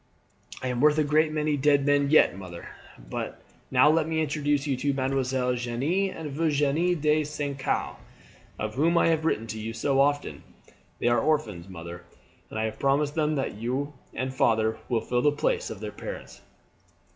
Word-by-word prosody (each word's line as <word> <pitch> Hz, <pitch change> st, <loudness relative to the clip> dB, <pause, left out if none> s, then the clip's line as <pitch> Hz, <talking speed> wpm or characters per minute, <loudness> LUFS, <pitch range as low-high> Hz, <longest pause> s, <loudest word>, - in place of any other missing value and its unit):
"I 130 Hz, -, -1 dB
am 125 Hz, -1 st, -1 dB
worth 150 Hz, +1 st, +5 dB
a 155 Hz, -, +4 dB
great 155 Hz, +2 st, +2 dB
many 155 Hz, -1 st, 0 dB
dead 140 Hz, 0 st, +3 dB
men 145 Hz, -1 st, +3 dB
yet, 155 Hz, -, +5 dB
mother. 90 Hz, -3 st, -9 dB, 0.3 s
But -, -, -6 dB, 0.3 s
now 130 Hz, +3 st, +5 dB
let 160 Hz, -1 st, +2 dB
me 160 Hz, -1 st, -1 dB
introduce 145 Hz, -2 st, 0 dB
to 145 Hz, -, -2 dB
you 135 Hz, +2 st, 0 dB
Mesdemoiselles 130 Hz, -2 st, 0 dB
Jeanne 140 Hz, +12 st, 0 dB
and 160 Hz, -5 st, -6 dB
Virginie 155 Hz, +3 st, +1 dB
de 155 Hz, -1 st, +2 dB
St. 145 Hz, -2 st, -4 dB
Caux, 135 Hz, -, -1 dB, 0.6 s
of 105 Hz, 0 st, -3 dB
whom 165 Hz, +7 st, +2 dB
I 165 Hz, -, +4 dB
have 160 Hz, -1 st, +1 dB
written 115 Hz, -8 st, 0 dB
to 110 Hz, -1 st, -6 dB
you 110 Hz, +1 st, -4 dB
so 135 Hz, +3 st, 0 dB
often. 145 Hz, +1 st, +1 dB, 0.6 s
They -, -, -1 dB
are 120 Hz, 0 st, +4 dB
orphans, 110 Hz, -, -1 dB
mother, 85 Hz, -1 st, -8 dB, 0.5 s
and -, -, -7 dB
I 110 Hz, -, 0 dB
have 110 Hz, 0 st, -3 dB
promised 140 Hz, +2 st, +2 dB
them 155 Hz, -1 st, +1 dB
that 135 Hz, -, -2 dB
you 130 Hz, +5 st, -2 dB, 0.2 s
and 130 Hz, 0 st, -2 dB
father 110 Hz, -3 st, +2 dB
will 115 Hz, -3 st, +1 dB
fill 120 Hz, 0 st, 0 dB
the 145 Hz, -, +4 dB
place 475 Hz, -, -1 dB
of -, -, -8 dB
their -, -, -5 dB
parents." -, -, -8 dB
140 Hz, 185 wpm, -27 LUFS, 120-150 Hz, 0.6 s, worth